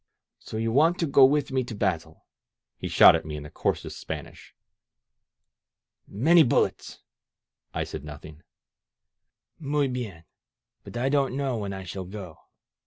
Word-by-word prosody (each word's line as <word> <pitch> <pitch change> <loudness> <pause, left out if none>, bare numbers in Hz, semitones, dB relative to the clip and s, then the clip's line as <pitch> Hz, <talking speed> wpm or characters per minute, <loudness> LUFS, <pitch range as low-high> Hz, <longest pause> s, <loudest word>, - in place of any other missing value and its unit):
"So 110 - -7
you 115 +1 -1
want 160 +8 +3
to 170 - 0
go 140 -2 +5
with 145 +1 +1
me 130 -1 +1
to 120 -2 -7
battle?" 85 -6 -3 0.5
he - - -6
shot - - +7
at - - -2
me 75 -1 -6
in 75 - -7
the 75 - -11
coarsest - - -3
Spanish. - - -8 1.5
Many 160 - +4
bullets!" 130 - 0 0.7
I - - -2
said - - -7
nothing. 75 +1 -11 1.2
Muy 145 -2 0
hien! 105 -10 -6 0.6
But - - -8
I 130 +3 0
don't 135 -2 +1
know 135 -4 -1
when 100 -2 -4
I 95 -1 -6
shall 95 +1 -6
go. 90 -4 -9
115 Hz, 150 wpm, -26 LUFS, 90-140 Hz, 1.5 s, shot